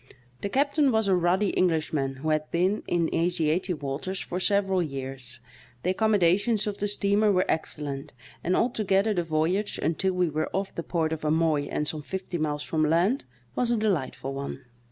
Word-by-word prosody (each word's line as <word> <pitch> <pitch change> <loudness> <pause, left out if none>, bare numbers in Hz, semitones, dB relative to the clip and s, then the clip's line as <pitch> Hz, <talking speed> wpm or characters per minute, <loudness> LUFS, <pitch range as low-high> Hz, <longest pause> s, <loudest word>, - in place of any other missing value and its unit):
The 200 - -2
captain 280 +3 +2
was 220 -2 +2
a 190 - +4
ruddy 180 +3 +2
English 165 -4 +1
man, 135 -2 -1
who 150 +4 -3
had 155 0 0
been 185 +5 +1
in 170 -2 0
Asiatic 170 -1 0
waters 145 +8 -3
for 180 - -4
several 195 -1 +2
years; 135 -4 -6 0.4
the 180 - +2
accommodations 205 +1 +2
of 205 -1 -4
the 205 - 0
steamer 205 +1 +3
were 185 -1 +2
excellent, 150 -2 -3 0.3
and 180 +2 +1
altogether 215 -3 +2
the 175 -3 0
voyage, 165 +6 0
until 185 +4 0
we 180 -1 +2
were 155 0 -2
off 195 0 -2
the - - -3
port 160 -2 -1
of 160 - -5
Amoy 155 -1 +2
and 150 - -1
some 155 0 -2
fifty 185 +2 -5
miles 150 -1 -1
from 160 - -1
land, 175 - +2 0.3
was 245 - +1
a 240 - +2
delightful 165 -10 -1
one. 140 -1 -6
175 Hz, 180 wpm, -27 LUFS, 155-200 Hz, 0.4 s, a